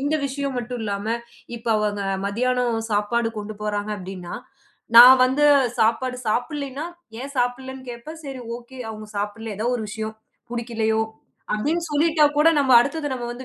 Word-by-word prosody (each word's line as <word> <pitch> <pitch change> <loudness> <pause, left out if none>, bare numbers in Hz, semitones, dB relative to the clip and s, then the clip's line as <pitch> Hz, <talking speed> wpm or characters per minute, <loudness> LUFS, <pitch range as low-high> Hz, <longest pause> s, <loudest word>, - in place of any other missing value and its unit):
இந்த 285 +3 0
விஷயம் 275 -1 -3
மட்டும் 245 0 -5
இல்லாம, 200 0 -3 0.5
இப்ப 230 +1 -6
அவங்க 205 -1 -1 0.2
மத்தியானம் 245 +2 0
சாப்பாடு 225 +3 +1
கொண்டு 210 0 -7
போறாங்க 210 0 -2
அப்டின்னா, 185 -2 -7 0.6
நான் 255 +2 +11
வந்து 265 +3 +2 0.4
சாப்பாடு 250 +3 +1
சாப்பிடலைன்னா, 280 +5 -2 0.3
ஏன் 280 +2 -7
சாப்பிடலைன்னு 260 +1 -2
கேப்பேன், 275 +7 -9
சரி 270 -2 -6 0.2
ஓகே. 245 +2 -13
அவங்க 215 -1 -8
சாப்பிடலை 210 +2 -4
ஏதோ 220 - -1
ஒரு 220 - -4
விஷயம் 220 0 -5 0.4
பிடிக்கலையோ, 225 -2 0 0.5
அப்டின்னு 305 +11 0
சொல்லிட்டா 310 +1 +3
கூட 300 +2 +6
நம்ம 270 -2 +3
அடுத்தது 290 +4 -1
நம்ம 245 -2 -4
வந்து 250 +2 -9
240 Hz, 145 wpm, -23 LUFS, 220-265 Hz, 0.6 s, நான்